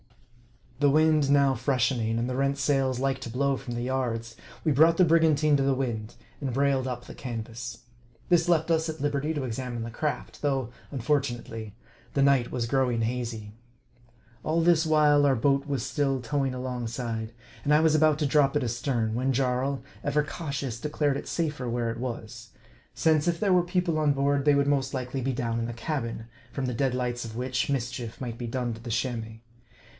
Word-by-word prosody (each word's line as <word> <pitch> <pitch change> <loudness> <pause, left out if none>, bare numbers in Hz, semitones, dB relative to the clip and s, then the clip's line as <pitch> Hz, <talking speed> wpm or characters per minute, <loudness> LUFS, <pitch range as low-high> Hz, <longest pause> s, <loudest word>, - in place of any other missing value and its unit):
The 145 -1 +4
wind 155 -1 +4
now 140 -1 +4
freshening, 120 -3 0
and 120 +1 0
the 125 - -2
rent 140 +1 +1
sails 135 -2 +1
like 135 +1 0
to 120 - -6
blow 135 +3 +1
from 120 -2 -6
the 120 - -2
yards, 120 -3 -2 0.3
we 155 - +2
brought 160 +4 +5
the 185 - +6
brigantine 155 -2 +4
to - - 0
the 135 0 +2
wind, 115 -5 -3 0.3
and 135 -2 -2
br 135 +4 +1
ailed 135 -2 +1
up 120 -1 -5
the - - -9
canvas. 115 -1 -6 0.5
This 175 -1 +3
left 165 -1 +2
us 160 0 +2
at 160 0 -5
liberty 145 +1 0
to 145 - -2
examine 120 -1 -4
the 115 - -6
craft, 150 +5 -4
though, 135 -5 0 0.2
unfortunately, 120 -5 -2 0.4
the 140 - +4
night 135 -3 +3
was 120 -2 -1
growing 125 -2 +1
hazy. 115 -3 -3 0.9
All 165 +2 +1
this 165 -2 +4
while 150 -2 +5
our 135 - +4
boat 140 +4 +1
was 140 -5 -2
still 135 -3 0
towing 135 +1 -1
alongside; 120 -3 -4 0.3
and 145 - 0
I 150 - +6
was 160 -1 +4
about 155 -1 +4
to 150 - 0
drop 140 0 +3
it 145 - -1
astern, 120 -1 -1
when 130 +3 0
Jarl, 130 +1 0 0.2
ever 150 +1 +1
cautious, 140 -6 -4
de 150 - -3
clared 145 -2 +1
it - - -5
safer 150 -7 -2
where 115 -1 -1
it 115 - -6
was; 115 -2 -6 0.5
since, 160 0 +2
if 170 -1 +1
there 200 -3 +3
were 180 - +5
people 175 -2 0
on 150 -2 +3
board, 140 0 +1
they 145 -1 +5
would 140 0 +3
most 135 -2 +1
likely 130 +1 -3
be 135 +2 0
down 115 -1 -1
in 115 - -2
the 120 - -5
cabin, 115 -3 -3 0.3
from 135 - -3
the 125 - -2
dead 130 +1 0
lights 125 -1 -2
of 110 -1 -7
which, 125 +1 -1
mischief 120 -3 -3
might 120 -2 -5
be 120 - -4
done 120 0 -2
to 115 - -10
the 120 - -7
Chamois. 115 -1 -2
135 Hz, 200 wpm, -27 LUFS, 120-145 Hz, 0.9 s, the